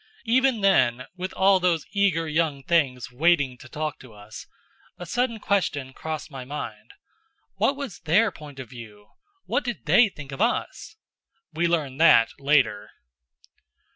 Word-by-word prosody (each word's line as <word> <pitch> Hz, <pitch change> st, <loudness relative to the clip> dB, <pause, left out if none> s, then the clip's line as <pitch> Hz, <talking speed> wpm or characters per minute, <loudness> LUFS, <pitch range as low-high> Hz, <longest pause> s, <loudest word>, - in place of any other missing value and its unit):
Even 255 Hz, -1 st, +2 dB
then, 130 Hz, -11 st, +3 dB
with 185 Hz, +1 st, -5 dB
all 190 Hz, 0 st, +4 dB
those 175 Hz, -4 st, +1 dB
eager 195 Hz, -6 st, +1 dB
young 155 Hz, -3 st, -1 dB
things 135 Hz, -7 st, 0 dB
waiting 140 Hz, -1 st, +2 dB
to 130 Hz, -, -13 dB
talk 155 Hz, +2 st, -4 dB
to 125 Hz, -4 st, -14 dB
us, 105 Hz, +1 st, -11 dB, 0.5 s
a 175 Hz, -, -8 dB
sudden 235 Hz, +6 st, -1 dB
question 145 Hz, -11 st, -1 dB
crossed 160 Hz, +1 st, -6 dB
my 135 Hz, -2 st, -7 dB
mind: 145 Hz, +4 st, -7 dB, 0.6 s
"What 220 Hz, +8 st, +2 dB
was 275 Hz, -8 st, -7 dB
their 200 Hz, +7 st, +2 dB
point 150 Hz, -4 st, -12 dB
of 130 Hz, -2 st, -8 dB
view? 110 Hz, -3 st, -13 dB, 0.4 s
What -, -, -1 dB
did 240 Hz, -2 st, -5 dB
they 230 Hz, -2 st, +5 dB
think 145 Hz, -6 st, -11 dB
of 135 Hz, -, -6 dB
us?" 235 Hz, -, -2 dB, 0.6 s
We 170 Hz, +1 st, +1 dB
learned 155 Hz, -4 st, -1 dB
that 115 Hz, -8 st, +6 dB
later. 135 Hz, -7 st, +1 dB
160 Hz, 150 wpm, -25 LUFS, 130-195 Hz, 0.6 s, that